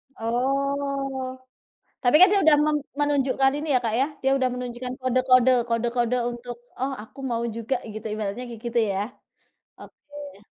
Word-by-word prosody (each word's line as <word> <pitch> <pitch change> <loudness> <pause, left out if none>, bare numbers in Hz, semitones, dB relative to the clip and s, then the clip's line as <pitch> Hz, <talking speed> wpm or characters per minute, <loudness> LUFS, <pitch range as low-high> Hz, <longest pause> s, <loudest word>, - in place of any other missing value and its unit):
Oh, 275 +2 -1 0.7
tapi 245 +3 +4
kan 370 - +9
dia 400 - +4
udah 310 -2 +6 0.4
menunjukkan 275 -2 +2
ini 310 - -5
ya 250 - +5
Kak 225 -2 -1
ya, 270 - +3 0.2
dia 270 - +3
udah 255 -1 +1
menunjukkan 250 0 -5
kode-kode, 255 0 +4 0.2
kode-kode 240 +1 0 0.2
untuk, 240 0 -7 0.2
"Oh 270 +1 -1
aku 265 - -16
mau 230 0 -1
juga," 230 +3 -2 0.2
gitu, 215 +1 -8
ibaratnya 215 +2 -4
kayak 230 -2 -9
gitu 235 0 0
ya? 195 - -1 0.8
Oke. 290 -8 -12
255 Hz, 145 wpm, -25 LUFS, 235-275 Hz, 0.8 s, kan